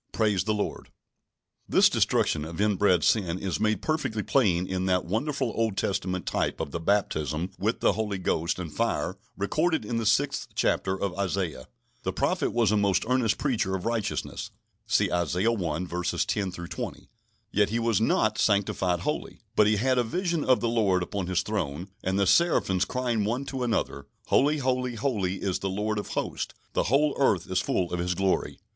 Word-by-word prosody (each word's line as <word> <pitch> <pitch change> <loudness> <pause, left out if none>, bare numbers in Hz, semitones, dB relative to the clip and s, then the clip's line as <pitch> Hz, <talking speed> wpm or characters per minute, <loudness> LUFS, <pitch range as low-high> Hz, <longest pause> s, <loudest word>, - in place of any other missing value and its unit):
Praise 105 -4 +1
the 110 - +1
Lord! 105 - -3 0.8
This - - +6
destruction 75 - +1
of 80 +2 -7
inbred 100 -4 +3
sin 90 -6 +2
is 95 -3 -3
made 110 0 +1
perfectly 150 -9 -1
plain 95 -10 +2
in 95 0 -2
that 90 -1 +1
wonderful 130 - -1
Old 110 -4 0
Testament 95 -2 -1
type - - -1
of - - -3
the 85 - -3
baptism 80 -3 0
with 110 +4 -1
the - - +4
Holy 105 -3 -2
Ghost 85 -2 -1
and 85 -4 -6
fire 115 -4 -1 0.2
recorded 155 - 0
in 115 +2 -2
the 115 - -1
sixth 140 +7 +1
chapter 95 0 +1
of 100 -3 -2
Isaiah. 90 -8 -2 0.3
The - - -2
prophet - - 0
was 115 -4 +2
a 105 - +3
most 100 -2 +2
earnest 125 -3 +2
preacher 115 -9 0
of 90 - -5
righteousness 115 -3 -2 0.4
(see - - +2
Isaiah 90 +5 +1
i. 90 -5 -2
10 90 +3 -1
20), 85 -1 -6 0.4
yet 105 0 +2
he 115 - 0
was 115 -2 +1
not 110 -1 +2
sanctified 95 -4 +1
wholly. 150 - -3
But 105 - +5
he 105 - +3
had 130 +4 +2
a - - +3
vision 170 +5 -1
of 130 -1 +3
the 120 - +1
Lord 100 -6 +2
upon 95 0 -4
His 90 -1 +1
Throne, 90 -4 -3
and 95 +1 0
the 100 - +3
seraphims 95 - +3
crying 120 -2 -1
one 120 +6 -1
to 135 -1 -4
another: 110 - -1 0.2
"Holy, 150 +3 +4
holy, 125 -2 -1
holy 100 -8 -1
is 95 -3 0
the 95 - -2
Lord 105 +2 -1
of - - -5
Hosts: - - -3 0.2
the - - +1
whole 140 +7 +2
earth 95 - +3
is 95 - +2
full 90 -2 -1
of 90 - -1
His 90 +1 -1
glory." 95 +1 0
100 Hz, 185 wpm, -27 LUFS, 90-115 Hz, 0.8 s, This